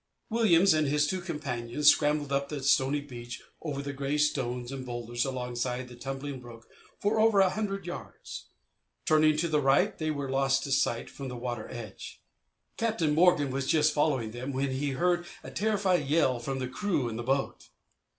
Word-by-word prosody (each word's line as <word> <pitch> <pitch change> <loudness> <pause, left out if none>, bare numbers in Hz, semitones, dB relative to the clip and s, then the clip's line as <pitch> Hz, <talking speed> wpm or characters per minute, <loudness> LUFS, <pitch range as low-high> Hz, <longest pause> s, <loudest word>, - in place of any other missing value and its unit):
Williams 195 -5 +5
and 155 -1 +2
his 150 +1 +2
two 185 +5 -2
companions 145 -5 -2
scrambled 145 -1 0
up 140 0 0
the 145 -3 -5
stony 135 +1 +3
beach 120 -4 -8 0.2
over 140 -3 -4
the 140 0 -4
grey 140 +2 -2
stones 125 -4 0
and 135 -1 -5
boulders 120 0 -3
alongside 125 -1 -3
the 125 - -11
tumbling 135 +2 -5
brook 120 -2 -13 0.3
for 215 +2 +1
over 220 -2 +5
a 190 -1 +5
hundred 195 -3 -3
yards. 175 - -8 0.6
Turning 155 0 +4
to 170 +2 +1
the 150 -2 +1
right 140 +9 +3
they 155 -1 -1
were 145 -2 -2
lost 135 0 +1
to 140 - -4
sight 120 -3 +1
from 140 - -8
the 125 -1 -6
water 120 -2 -4
edge. 110 -5 -8 0.6
Captain 215 -10 +1
Morgan 165 -4 +4
was 135 0 -2
just 155 -1 +3
following 135 -7 +1
them 125 +4 -5
when 135 +1 -1
he 135 +1 -1
heard 175 +4 +1 0.2
a - - -8
terrified 195 -7 +1
yell 140 -5 +2
from 135 +3 -3
the 130 -1 -2
crew 145 -2 -1
in 115 - -4
the 120 - -3
boat. 135 +3 -2
140 Hz, 185 wpm, -29 LUFS, 130-155 Hz, 0.6 s, Williams